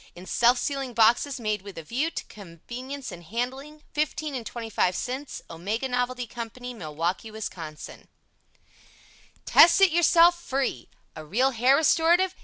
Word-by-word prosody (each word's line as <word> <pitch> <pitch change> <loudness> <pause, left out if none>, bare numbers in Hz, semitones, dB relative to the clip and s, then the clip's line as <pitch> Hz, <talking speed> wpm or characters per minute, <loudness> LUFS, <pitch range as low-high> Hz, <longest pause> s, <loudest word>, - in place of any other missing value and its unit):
In 180 +1 -11
self 240 +5 +3
sealing 270 -2 -3
boxes 240 +5 +3
made 215 -3 -2
with 200 0 -11
a 165 - -6
view 260 - -1
to - - -6
convenience 240 - -9
in 175 - -9
handling, 260 - -5
15 305 0 -2
and 250 -3 -4
25 225 -6 -1
cents. 260 +3 -5
OMEGA 205 +10 -3
NOVELTY 250 0 -1
COMPANY, 240 +1 -7
Milwaukee, 170 +2 -3
Wis. 220 0 -5 1.9
Test 340 +2 +7
It 390 -2 +6
Yourself 345 +1 +5
FREE 265 - -2 0.3
A 155 - -8
real 240 - +1
Hair 250 +3 +4
Restorative? 335 +4 +3
245 Hz, 140 wpm, -26 LUFS, 215-285 Hz, 1.9 s, Test